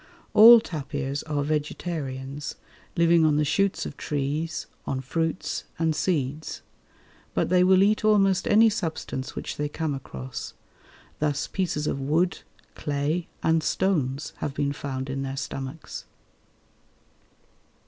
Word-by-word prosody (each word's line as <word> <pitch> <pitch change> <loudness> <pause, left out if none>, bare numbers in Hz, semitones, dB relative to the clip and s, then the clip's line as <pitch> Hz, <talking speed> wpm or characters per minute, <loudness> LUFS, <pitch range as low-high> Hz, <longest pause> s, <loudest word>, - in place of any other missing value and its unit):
All 230 +2 +10
tapirs 140 -6 -4
are 145 -1 0
vegetarians, 145 -2 -3 0.4
living 170 0 +5
on 155 -1 +4
the 150 - +2
shoots 195 +6 +1
of - - -7
trees, 150 +2 -2 0.2
on 135 - -1
fruits 160 +6 -2
and 160 -1 +1
seeds; 150 -3 -2 0.7
but - - +1
they 180 0 +5
will 190 +1 +6
eat 210 +2 +2
almost 195 -3 +3
any 220 +2 +6
substance 160 -10 -3
which - - -5
they 150 0 -1
come 155 0 -2
across. 65 - -7 0.6
Thus 150 -1 0
pieces 170 -6 -2
of 140 - -1
wood, 165 +7 +1 0.3
clay, 150 +4 -1 0.2
and 160 0 +3
stones 150 -5 0
have 140 - -4
been 140 0 0
found 135 -2 -4
in 135 0 -3
their 135 0 -4
stomachs. 135 +3 -6
150 Hz, 130 wpm, -26 LUFS, 140-175 Hz, 0.7 s, All